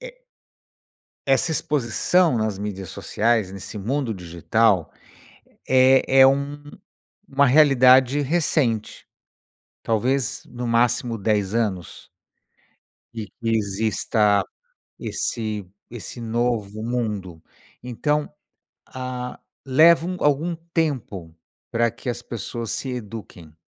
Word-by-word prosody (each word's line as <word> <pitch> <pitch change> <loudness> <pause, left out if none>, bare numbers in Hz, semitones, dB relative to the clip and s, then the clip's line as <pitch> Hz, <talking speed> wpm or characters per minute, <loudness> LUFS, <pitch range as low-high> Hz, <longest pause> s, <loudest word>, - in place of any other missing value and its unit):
é - - -11 1.1
essa 135 +5 +3
exposição 150 +2 +1
nas 110 -3 -2
mídias 100 -3 -5
sociais, 110 -4 0
nesse 100 +2 -8
mundo 120 +3 -2
digital, 90 +2 +1 0.8
é 130 +1 +4
é 130 - +9
um 140 +2 -1 0.7
uma 140 0 +3
realidade 130 -1 +5
recente, 140 -7 -1 0.8
talvez 120 +3 0
no 120 0 -6
máximo 115 0 +1
10 105 -1 0
anos. 100 -7 -3 1.1
De 110 -2 -5
que 115 - -3
exista 105 0 +1 0.5
esse 105 -3 -3 0.2
esse 120 +1 -8
novo 110 -2 -2
mundo, 105 -8 -3 0.4
então, 145 +5 -2 0.6
ah, 125 -1 -6 0.2
leva 160 +5 +5
um 180 0 -3
algum 150 +4 +1 0.2
tempo 105 - -2 0.4
pra 115 0 +1
que 125 - -7
as 120 - -3
pessoas 115 0 -5
se 130 - -3
eduquem. 105 -9 -8
120 Hz, 100 wpm, -23 LUFS, 105-135 Hz, 1.1 s, é